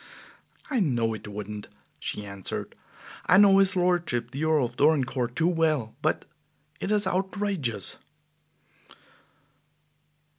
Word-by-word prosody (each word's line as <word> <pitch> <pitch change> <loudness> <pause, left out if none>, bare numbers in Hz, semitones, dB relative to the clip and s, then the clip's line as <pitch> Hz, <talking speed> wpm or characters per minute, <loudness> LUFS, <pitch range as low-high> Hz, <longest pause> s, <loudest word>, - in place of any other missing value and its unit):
"I 260 - +2
know 120 - +1
it 110 - -8
wouldn't," 105 0 -6 0.3
she 105 - -4
answered. 100 -1 -5 0.5
"I 185 - +6
know 195 -1 +7
his 195 -1 +4
lordship 175 -10 0
the 140 +3 -4
Earl 155 -4 +3
of 120 0 -7
Dorincourt 135 -5 +1
too 165 +4 +2
well; 155 -9 +1
but - - 0 0.5
it - - -3
is 210 0 +2
outrageous." 190 - -1
150 Hz, 115 wpm, -27 LUFS, 115-185 Hz, 0.5 s, know